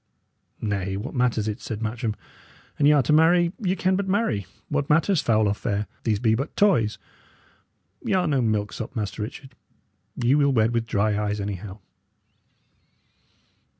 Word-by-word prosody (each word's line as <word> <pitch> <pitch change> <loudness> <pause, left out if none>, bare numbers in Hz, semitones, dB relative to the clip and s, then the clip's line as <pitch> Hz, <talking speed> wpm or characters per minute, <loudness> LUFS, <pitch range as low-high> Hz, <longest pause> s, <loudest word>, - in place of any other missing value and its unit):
"Nay, 100 -2 -2
what 105 +7 -6
matters 120 -4 +1
it?" 105 -1 -4
said 110 - -5
Matcham. 110 0 -2 0.6
"An 145 - +5
y' - - +7
are 145 -3 +4
to 150 - +1
marry, 170 +2 +4
ye 185 -3 0
can 185 0 +1
but 195 0 -1
marry. 190 - 0 0.2
What 145 0 -1
matters 160 +3 +3
foul 110 -2 +2
or 100 - +2
fair? 105 0 -2 0.2
These 110 -3 +2
be 110 +1 +2
but 135 +5 -3
toys. 155 - +3 1.1
Y' - - -1
are 185 -1 +2
no 140 -5 +1
milksop, 110 +2 -2
Master 105 -1 -3
Richard; 130 +5 -7 0.6
ye 125 +1 +2
will 140 -1 +3
wed 115 -1 +3
with 115 -1 -1
dry 105 0 +1
eyes, 105 0 -1
anyhow." 100 0 -5
115 Hz, 160 wpm, -24 LUFS, 105-150 Hz, 1.1 s, y